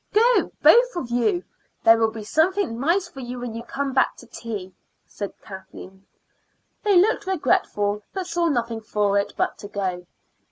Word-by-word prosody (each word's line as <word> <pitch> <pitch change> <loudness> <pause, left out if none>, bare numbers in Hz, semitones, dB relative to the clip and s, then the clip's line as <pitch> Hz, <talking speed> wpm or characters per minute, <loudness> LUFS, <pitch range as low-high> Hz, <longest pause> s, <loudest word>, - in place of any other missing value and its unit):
"Go, 475 +3 +4
both - - +6
of 260 -9 -4
you. 350 - +1 0.4
There 225 0 +6
will 225 -1 +3
be 220 -1 -8
something 320 - +1
nice 345 +7 +1
for 335 -6 -12
you 250 -1 -6
when 245 -2 -5
you 230 - -5
come 275 +2 -4
back 265 - +2
to - - -13
tea," 210 -6 -7 0.3
said 200 -2 -7
Kathleen. 190 0 -11 0.7
They 410 -3 +3
looked 415 +1 +2
regretful, 210 - 0
but 380 -1 -4
saw 345 -1 0
nothing 235 -6 -1
for 205 -2 +1
it 200 - -3
but - - -1
to 205 - -8
go. 185 -3 -4
240 Hz, 170 wpm, -23 LUFS, 210-350 Hz, 0.7 s, both